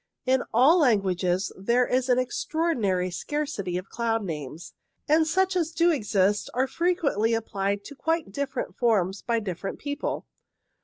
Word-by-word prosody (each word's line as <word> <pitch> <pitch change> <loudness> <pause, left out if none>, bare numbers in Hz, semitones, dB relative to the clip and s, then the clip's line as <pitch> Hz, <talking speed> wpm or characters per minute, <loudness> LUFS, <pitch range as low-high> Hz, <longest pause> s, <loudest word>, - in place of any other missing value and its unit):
In 260 0 +3
all 275 +10 +5
languages 190 - +1
there 235 +6 +2
is 255 +1 0
an 250 - +4
extraordinary 245 - 0
scarcity 205 - -3
of 185 - -7
cloud 225 -2 -1
names, 155 -2 -6 0.3
and 315 +1 +4
such 375 +3 +1
as 335 -3 +1
do 340 +1 +3
exist 205 - +1
are 260 +2 +2
frequently 280 - +1
applied 200 -2 -2
to 285 - -9
quite 325 -4 -1
different 275 +3 -4
forms 200 -5 +1
by 235 -1 0
different 195 -2 -5
people. 285 +1 -4
235 Hz, 145 wpm, -26 LUFS, 195-295 Hz, 0.3 s, all